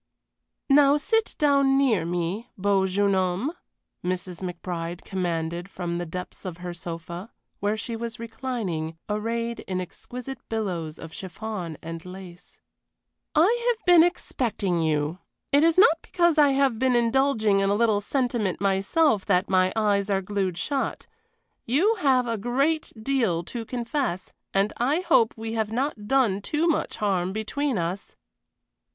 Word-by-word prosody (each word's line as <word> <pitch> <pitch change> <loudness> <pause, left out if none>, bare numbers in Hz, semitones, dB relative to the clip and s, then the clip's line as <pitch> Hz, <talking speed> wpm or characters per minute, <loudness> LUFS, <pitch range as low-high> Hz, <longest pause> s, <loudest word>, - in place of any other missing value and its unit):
"Now 280 0 +6
sit 445 +9 0
down 280 -3 +4
near 230 -11 +2
me, 175 +7 -2
beau 195 -1 +2
jeune 200 +1 +2
homme," 190 - 0 0.5
Mrs. 180 0 -3
McBride 175 -1 -5
commanded 175 -1 -3
from 175 -2 -3
the 175 - -4
depths 180 +2 -7
of 180 -4 -6
her 175 0 -6
sofa, 170 +3 -7 0.3
where 205 +2 0
she 230 +1 -4
was 230 +1 -5
reclining, 220 -9 -4
arrayed 230 +2 -2
in 185 -1 -2
exquisite 250 +8 -7
billows 180 -8 -3
of 165 -1 -10
chiffon 185 -3 -6
and 165 0 -6
lace. 180 -1 -11 0.8
"I 435 +10 +4
have 450 - -35
been 350 -2 +8
expecting 225 - -1
you. 155 +2 0 0.3
It 285 +1 +5
is 330 +1 +4
not 370 -5 +6
because 345 -3 +2
I 290 -1 +7
have 270 -4 +2
been 260 -1 +3
indulging 230 -4 +3
in 195 0 +2
a 200 - +3
little 215 -2 +2
sentiment 240 -6 -1
myself 200 - +2
that 180 +3 +2
my 185 0 +4
eyes 205 -2 +1
are 195 -1 +1
glued 190 -2 -2
shut 275 - -2 0.6
you 325 - +3
have 260 -5 +3
a 230 -2 -2
great 275 +8 0
deal 220 -9 +1
to 230 +6 -6
confess 240 -5 -3 0.2
and 195 +2 +1
I 280 +8 +1
hope 315 -11 +3
we 225 0 -4
have 220 -1 -1
not 235 -3 -2
done 230 -6 +2
too 305 +10 0
much 330 - 0
harm 190 -3 0
between 225 +5 -1
us." 175 +3 -3
210 Hz, 150 wpm, -25 LUFS, 180-265 Hz, 0.8 s, been